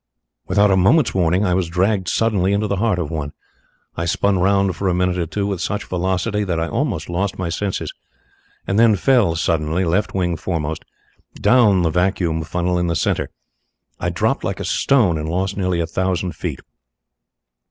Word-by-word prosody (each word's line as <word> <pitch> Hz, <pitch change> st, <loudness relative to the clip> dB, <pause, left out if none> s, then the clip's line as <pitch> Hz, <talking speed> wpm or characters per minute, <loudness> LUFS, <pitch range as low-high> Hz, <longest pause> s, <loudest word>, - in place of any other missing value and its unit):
Without 100 Hz, 0 st, +3 dB
a -, -, +4 dB
moment's 115 Hz, -, +3 dB
warning 90 Hz, +2 st, +2 dB
I 90 Hz, -, +1 dB
was 90 Hz, -2 st, 0 dB
dragged 95 Hz, +2 st, 0 dB
suddenly 100 Hz, -4 st, +1 dB
into 105 Hz, +1 st, +1 dB
the 100 Hz, -1 st, -1 dB
heart 105 Hz, -2 st, +1 dB
of 85 Hz, -3 st, -3 dB
one. 75 Hz, -3 st, -4 dB, 0.6 s
I 85 Hz, -, -2 dB
spun 95 Hz, +2 st, +1 dB
round 95 Hz, 0 st, +2 dB
for 100 Hz, -, -2 dB
a 90 Hz, -, +1 dB
minute 90 Hz, 0 st, 0 dB
or 85 Hz, -, -1 dB
two 100 Hz, +4 st, -2 dB
with 100 Hz, -3 st, -3 dB
such 100 Hz, -, -2 dB
velocity 95 Hz, +4 st, -1 dB
that 90 Hz, -4 st, -1 dB
I 80 Hz, -, -1 dB
almost -, -, -2 dB
lost 95 Hz, +3 st, -2 dB
my 90 Hz, -2 st, -3 dB
senses, 95 Hz, +3 st, -3 dB, 0.7 s
and 100 Hz, +3 st, 0 dB
then 115 Hz, -2 st, +5 dB
fell 105 Hz, -5 st, +3 dB
suddenly, 80 Hz, +2 st, 0 dB
left 95 Hz, +6 st, 0 dB
wing 90 Hz, -3 st, 0 dB
foremost, 80 Hz, -2 st, -3 dB, 0.5 s
down 105 Hz, -8 st, +4 dB
the 80 Hz, -, +1 dB
vacuum 90 Hz, -2 st, 0 dB
funnel 90 Hz, +3 st, -1 dB
in 90 Hz, -, 0 dB
the 85 Hz, -, -1 dB
centre. -, -, 0 dB, 0.7 s
I -, -, -1 dB
dropped -, -, 0 dB
like -, -, -3 dB
a -, -, -4 dB
stone, 105 Hz, -, +2 dB
and 75 Hz, +1 st, -4 dB
lost 95 Hz, +3 st, -1 dB
nearly 90 Hz, -3 st, -1 dB
a 85 Hz, -, 0 dB
thousand 95 Hz, +1 st, -1 dB
feet. -, -, -5 dB
90 Hz, 185 wpm, -20 LUFS, 85-100 Hz, 0.7 s, then